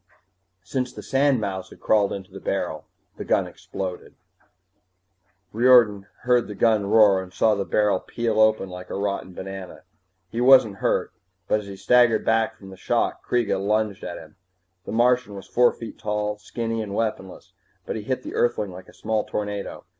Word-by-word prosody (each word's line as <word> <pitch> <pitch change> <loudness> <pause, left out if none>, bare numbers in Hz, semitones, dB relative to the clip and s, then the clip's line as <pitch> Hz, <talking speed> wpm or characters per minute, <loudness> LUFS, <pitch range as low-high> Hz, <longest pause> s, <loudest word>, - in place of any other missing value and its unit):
Since 125 +6 -3
the - - -9
sandmouse 110 -10 0
had - - -15
crawled 105 -2 +2
into 95 -1 -7
the - - -9
barrel, - - -3 0.3
the - - -5
gun - - +1
exploded. 95 -2 -7 1.4
Riordan 115 -4 +5
heard 125 -1 +2
the 105 - -7
roar 105 -2 +4
and 95 -1 -10
saw 110 +3 +2
the 100 -1 -2
barrel 105 -3 +2
peel 115 -2 -2
open 110 -2 +3
like 90 0 -9
a - - -4
rotten 100 -1 -3
banana. 95 -1 -8 0.5
He 115 - -2
wasn't 125 -6 +6
hurt, - - 0 0.3
but 105 - +2
as 105 - -10
he 100 - -7
staggered 120 +2 +3
back 115 0 +1
from 95 -3 -12
the 95 - -11
shock - - -1
Kreega 120 -5 0
lunged 105 0 0
at 85 - -5
him. 80 +1 -14 0.5
The - - -4
Martian 120 -2 +2
was 100 - -9
four 125 0 +3
feet 115 -2 -10
tall, 105 0 -1
and 105 0 -10
skinny 115 +1 -3
and 100 -2 -5
weaponless, 105 -5 -4 0.3
but - - -4
he 110 - -4
hit 130 +4 -3
the - - -7
Earthling 115 -5 0
like 90 +1 -11
a - - -16
small 110 -1 -1
tornado. 105 -1 -5
105 Hz, 175 wpm, -24 LUFS, 95-115 Hz, 1.4 s, wasn't